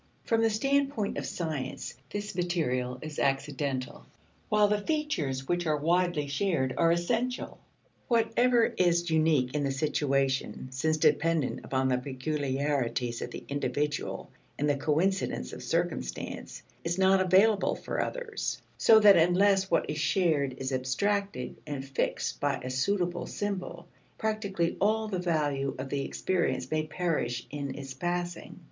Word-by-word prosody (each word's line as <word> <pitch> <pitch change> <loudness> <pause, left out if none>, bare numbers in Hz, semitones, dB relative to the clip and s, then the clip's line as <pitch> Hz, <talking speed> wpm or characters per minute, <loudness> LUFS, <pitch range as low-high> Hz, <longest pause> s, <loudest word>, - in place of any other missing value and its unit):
From 225 -1 +2
the 225 - +4
standpoint 275 -1 0
of - - -4
science, 155 -7 -4 0.2
this 205 0 -4
material 155 -9 -1
is 155 -2 -6
accidental, 135 -1 -1 0.5
while 210 0 +4
the 210 0 +1
features 160 - -1
which 175 -1 0
are 155 -1 +2
widely 170 0 +1
shared 140 -3 0
are 165 0 +4
essential. 230 +9 -1 0.5
Whatever 235 +1 +3
is 175 -1 +2
unique 155 -5 +3
in 150 - 0
the 140 - 0
situation, 135 -2 0
since 155 +4 0
dependent 155 -1 +2
upon 130 0 0
the 125 -1 +2
peculiarities 130 -2 -1
of - - -4
the - - -8
individual 145 +1 -2 0.3
and 145 - 0
the 145 - +3
coincidence 155 - 0
of - - -7
circumstance, 60 - -3 0.2
is 170 +1 -1
not 190 0 +4
available 195 +3 +4
for - - -3
others; 485 -4 -4 0.2
so 220 -1 +7
that 205 -3 +8
unless 190 +3 +4
what 170 - +2
is 150 +1 -3
shared 150 -6 +1
is 135 0 -3
abstracted 130 +4 -1
and 140 -2 -4
fixed 135 -1 -2
by 145 0 +1
a 130 - -4
suitable 175 +6 0
symbol, 185 -4 -4 0.3
practically 200 -6 -1
all 220 +2 +2
the 190 -4 -2
value 145 -6 0
of 130 +1 -5
the 140 0 -1
experience 185 +3 -1
may 155 0 0
perish 150 -9 -1
in 140 -1 -4
its 135 -1 -7
passing. 175 +5 -4
160 Hz, 140 wpm, -29 LUFS, 140-195 Hz, 0.5 s, that